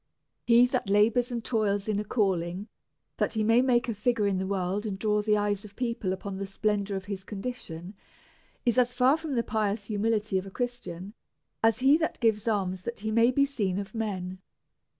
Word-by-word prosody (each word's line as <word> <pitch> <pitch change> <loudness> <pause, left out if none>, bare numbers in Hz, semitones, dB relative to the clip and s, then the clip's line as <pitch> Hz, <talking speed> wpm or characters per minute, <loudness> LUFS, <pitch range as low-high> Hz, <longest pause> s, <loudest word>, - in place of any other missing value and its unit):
He 240 +1 +7
that 250 -5 -1
labours 230 +5 +3
and 235 -2 -4
toils 205 -4 0
in 210 -1 0
a - - -1
calling, 190 -3 -1 0.5
that - - 0
makes 240 +3 +3
a 230 - -1
figure 220 0 0
in 195 -2 +1
the 190 - -2
world, 195 +2 -1
and 195 -2 -3
draws 210 0 0
the 210 0 +4
eyes 205 -1 0
of 205 -2 -13
people 230 -6 -2
upon 190 +1 -4
the 195 0 -4
splendour 200 0 -1
of 190 - -7
his 200 -2 -5
condition, 195 -4 -6 0.7
is 240 +1 +3
as 250 0 +2
far 255 +3 +5
from 315 -4 -4
the 235 - +1
pious 210 -1 -1
humility 210 -1 0
of 190 - -8
a - - -6
Chris 245 +4 -3
tian 185 +1 -8 0.5
as 225 -1 +4
he 275 +3 +6
that 320 -1 -2
gives 220 -2 +1
alms 190 -4 0
that 235 +2 -6
he 220 +1 -2
may 230 +2 +5
be 280 +2 +3
seen 205 -10 -1
of 200 +1 -5
men. 190 -5 -3
210 Hz, 200 wpm, -28 LUFS, 195-235 Hz, 0.7 s, He